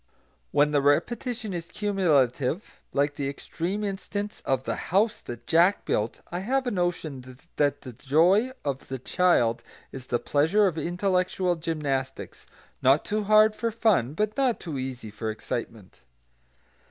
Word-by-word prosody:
When 145 - +3
the 145 -1 +3
repetition 220 - 0
is 170 -1 -5
cumulative, 165 - 0
like 145 +1 +1
the 140 -2 -1
extreme 175 +8 -4
instance 205 +1 -4
of 130 -1 0
The - - -2
House 210 +4 +2
that 120 -1 -8
Jack 175 +5 +3
Built, 105 +2 -1
I 175 - -2
have 260 +7 0
a 245 - -1
notion 155 -9 -3 0.2
that 145 -1 +1
the 130 -3 -9
joy 170 - +3
of 140 -2 -3
the 130 - -4
child 125 -5 +2 0.3
is 130 -2 -9
the 120 - +1
pleasure 160 - +2
of 180 -5 +1
intellectual 180 +2 0
gymnastics, 145 -5 -3 0.3
not 135 +3 +4
too 210 0 -1
hard 215 +1 +5
for 230 - -1
fun, 210 - +1
but 210 +3 -1
not 265 -4 +1
too 155 -6 -5
easy 130 -4 -5
for 110 +1 -4
excitement. 110 -2 -6
165 Hz, 150 wpm, -26 LUFS, 135-205 Hz, 0.3 s, hard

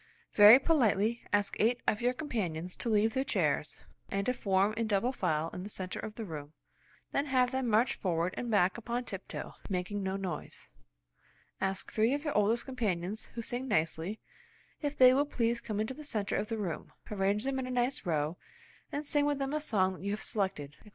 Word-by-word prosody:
"Very 210 +3 +10
politely 235 -7 +2
ask 205 -1 +1
eight 240 +3 +3
of 210 - +1
your 245 +1 +2
com 300 +4 -6
panions 180 - -3
to 240 - -2
leave 220 +1 +3
their 265 0 +1
chairs, 275 - 0 0.3
and 195 0 -1
to 250 - +2
form 200 -3 +2
in 225 0 -1
double 215 +4 +1
file 165 -9 -1
in 180 - -5
the 200 - -6
centre 185 -3 -4
of 215 - -6
the 225 - -5
room, 150 -4 -7 0.6
then 280 +1 0
have 255 -2 +3
them 260 -1 -1
march 230 +3 +3
forward 175 -1 -1
and 240 - -4
back 200 -2 +3
on 240 +1 0
tiptoe, 195 -4 -6 0.2
making 190 +2 -2
no 190 0 -2
noise." 185 -5 -5 0.9
"Ask 190 0 -2
three 225 +5 +2
of 290 - -4
your 295 - -2
oldest 215 +3 +2
companions 215 -5 -2
who 230 - -4
sing 245 +3 -3
nicely, 165 +1 0 0.6
if 290 -1 -2
they 255 0 +8
will 285 +2 +2
please 235 -3 0
come 215 -3 -3
into 220 +4 -1
the 305 - -10
centre 215 -8 -2
of 210 - -1
the 225 - -2
room. 185 -7 -4 0.2
Arrange 200 +1 +1
them 270 0 -1
in 255 - -3
a - - -5
nice 250 +1 0
row, 160 -2 -1 0.5
and 295 +1 -3
sing 290 0 +2
with 290 -1 +1
them 275 +1 -2
a 305 - 0
song 190 -9 +2
that 185 - -11
you 200 - -2
have 205 +1 -2
selected," 185 -9 -2
etc. 210 - -17
215 Hz, 210 wpm, -31 LUFS, 190-250 Hz, 0.9 s, Very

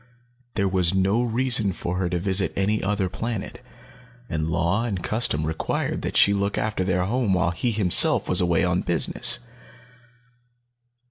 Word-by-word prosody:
There 100 - 0
was 95 -1 +1
no 95 +5 +1
reason 120 -4 +1
for 90 +1 -4
her 90 -2 -1
to 90 - -1
visit 95 +1 +1
any 105 +3 0
other 100 -1 -1
planet, 115 +2 -6 0.7
and 80 -5 -3
law 85 +6 0
and 100 -7 -4
custom 105 -9 0
required 80 +1 -3
that - - -3
she 100 - +5
look 100 0 -2
after 110 -3 -2
their 90 -1 0
home 110 -2 0
while 90 -1 +1
he 85 +8 -2
himself 105 -6 +3
was 90 +1 +4
away 85 0 +1
on 90 0 0
business. 85 - +2
95 Hz, 155 wpm, -23 LUFS, 90-105 Hz, 0.7 s, she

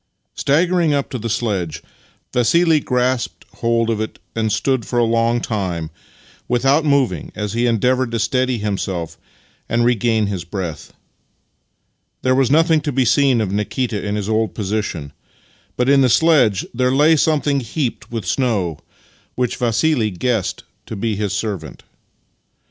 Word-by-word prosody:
IX - - -7
Staggering 170 +2 +2
up 140 - -2
to 125 - -3
the 115 +1 -4
sledge, 100 -8 -2 0.5
Vassili 160 +6 +3
grasped 125 -2 -1
hold 115 0 +1
of 110 -1 -1
it 110 - -5 0.2
and 110 -1 0
stood 120 +3 0
for 120 - -4
a 120 - +4
long 115 +1 +2
time 95 -9 -3 0.6
without 135 +5 +2
moving 135 - +1
as 105 -1 -3
he 120 +1 +1
endeavoured 125 +2 +1
to 115 - -2
steady 130 +2 0
himself 95 -5 -3 0.5
and 120 +2 +2
regain 115 -2 +2
his 100 -4 -3
breath. 85 -4 -6 1.3
There 130 - +3
was 130 -1 +2
nothing 160 +2 +4
to 145 - -2
be 130 -1 +1
seen 130 0 +3
of 100 -3 -2
Nikita 105 +2 -2
in 105 0 -2
his 105 -2 -3
old 110 0 0
posi 105 0 -1
tion, 70 -5 -6 0.6
but 125 - +1
in 140 0 +5
the 130 - +4
sledge 125 - +3
there 125 +1 +1
lay 150 +4 +5
something 150 -2 +1
heaped 125 +1 -3
with 115 -5 -4
snow, 95 - 0 0.6
which 125 -2 -1
Vassili 120 0 +1
guessed 95 -1 -2 0.2
to - - -6
be 110 +1 -1
his 105 -1 -2
servant. 100 -1 -4
115 Hz, 155 wpm, -19 LUFS, 105-130 Hz, 1.3 s, in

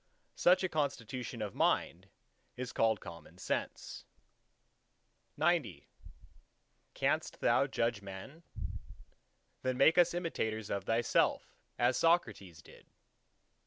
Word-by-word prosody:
Such 180 +2 +4
a - - +2
constitution 130 -6 -3
of 105 - -4
the - - -13
Mind 90 +4 +1 0.5
is 125 0 -5
called 110 -2 +2
Common 85 -3 -11
Sense. - - -4 1.3
XCI 145 - +1 1.1
Canst - - 0
thou - - +3
judge 115 -2 -1
men?... 100 - -9 1.2
then 130 -1 -1
make 160 +6 +5
us 175 0 +4
imitators 110 - -2
of 100 -1 -2
thyself, 115 +2 +1 0.2
as 120 +1 +2
Socrates 105 - +1
did. - - -17
120 Hz, 105 wpm, -33 LUFS, 100-155 Hz, 1.3 s, make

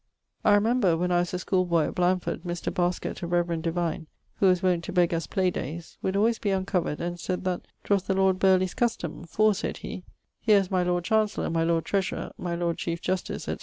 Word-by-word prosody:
I - - +6
remember 205 -5 +3
(when 180 +2 0
I 175 - +4
was 175 0 -1
a - - 0
schooleboy 180 -3 +1
at - - -7
Blandford) 180 0 0
Mr. 175 -1 -4
Basket, 175 +1 -1
a 170 - -3
reverend 170 -1 0
divine, 165 -1 -2 0.3
who 195 - +4
was 180 -1 +3
wont 180 -2 +2
to - - -5
beg 175 -2 +3
us 165 -2 -2
play 185 -1 +1
dayes, 165 +2 -6
would 190 - -1
alwayes 220 +3 +2
be 205 - 0
uncovered, 190 -5 0
and 175 0 -4
sayd 185 +1 -3
that 185 -1 -2 0.2
''twas 200 -2 +1
the 190 - +1
lord 190 -1 +3
Burleigh's 185 -1 +3
custome, 175 - -2
for 215 +3 +3
(said 195 - -3
he) 185 - -6 0.4
_here 210 -2 +7
is 195 -1 -3
my 185 -1 +2
Lord 175 -1 0
Chanceller, 215 -1 +1
my 165 0 +1
Lord 165 0 +1
Treasurer, 195 -1 -1
my 175 -1 -2
Lord 170 -1 -1
Chief 170 0 -2
Justice, 185 +1 -2
&c. - - -3
180 Hz, 220 wpm, -27 LUFS, 170-190 Hz, 0.4 s, here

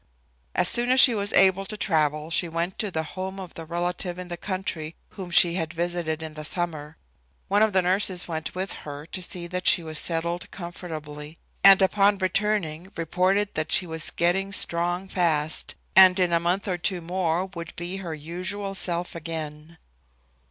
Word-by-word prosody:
As 180 - +3
soon 240 +1 +4
as 260 +1 +5
she 255 -2 +8
was 205 -2 -2
able 190 0 +5
to 210 +2 -7
travel 155 -4 0
she 170 +1 +1
went 170 +3 -3
to 210 - 0
the 160 -3 -2
home 190 +4 -6
of 185 -2 -8
the 165 - -8
relative 175 +1 -2
in 180 -1 -7
the 175 - -3
country 170 -4 -4
whom 190 -3 -8
she 170 0 +5
had 165 -2 -3
visited 170 -2 -2
in 160 -1 -6
the 155 0 -7
summer. 155 -2 -4 0.5
One 205 +1 +3
of 220 0 +4
the 190 -1 +2
nurses 185 0 +1
went 160 -1 -4
with 190 +1 -3
her 145 0 -8
to 185 +3 -7
see 175 -1 -4
that 180 +1 -3
she 175 - +5
was 155 -1 -4
settled 170 +1 -2
comfortably, 155 -4 -8 0.3
and 195 0 +8
upon 200 +1 +3
returning 190 -3 -1
reported 185 +5 +1
that 155 0 -3
she 185 - +4
was 160 -1 -2
getting 190 +3 0
strong 175 0 +1
fast, 160 -5 0 0.2
and 190 0 +8
in 180 -2 +2
a 170 - +4
month 180 +5 -1
or 180 -2 -1
two 180 0 -2
more 175 0 -1
would 170 -3 -8
be 175 +2 -5
her 170 -5 -5
usual 185 +6 -4
self 175 -2 -1
again. 160 -1 -6
175 Hz, 185 wpm, -25 LUFS, 165-190 Hz, 0.5 s, she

